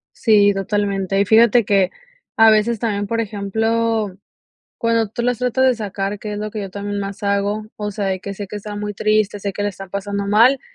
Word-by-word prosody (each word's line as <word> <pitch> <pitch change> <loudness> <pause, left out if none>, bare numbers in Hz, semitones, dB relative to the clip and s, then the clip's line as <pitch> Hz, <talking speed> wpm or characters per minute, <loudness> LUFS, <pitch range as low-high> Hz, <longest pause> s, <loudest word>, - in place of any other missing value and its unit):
Sí, 205 -3 +4
totalmente. 195 -1 -1
Y 200 - +3
fíjate 230 +3 +5
que 195 -2 +2 0.4
a 225 0 +7
veces 215 +1 +2
también, 205 -2 -1
por 230 +2 0
ejemplo, 220 0 -1 0.6
cuando 230 -1 +1
tú 235 +4 -4
las 245 -1 0
tratas 250 +1 +1
de 255 - +4
sacar, 205 -2 -4
que 210 +1 -6
es - - -5
lo 215 0 -4
que 215 - -5
yo 195 -2 -6
también 205 +1 -4
más 200 +1 -6
hago, 200 +1 0
o 210 -1 -3
sea, 200 0 -3
de 190 -1 -1
que 200 +1 -6
sé 205 +1 -6
que 200 - -7
está 205 0 -7
muy 205 0 -4
triste, 215 0 +1
sé 200 0 -3
que 205 - -4
la 205 - +1
están 195 -1 -9
pasando 200 +1 -3
mal 230 +6 +4
205 Hz, 220 wpm, -20 LUFS, 200-225 Hz, 0.6 s, a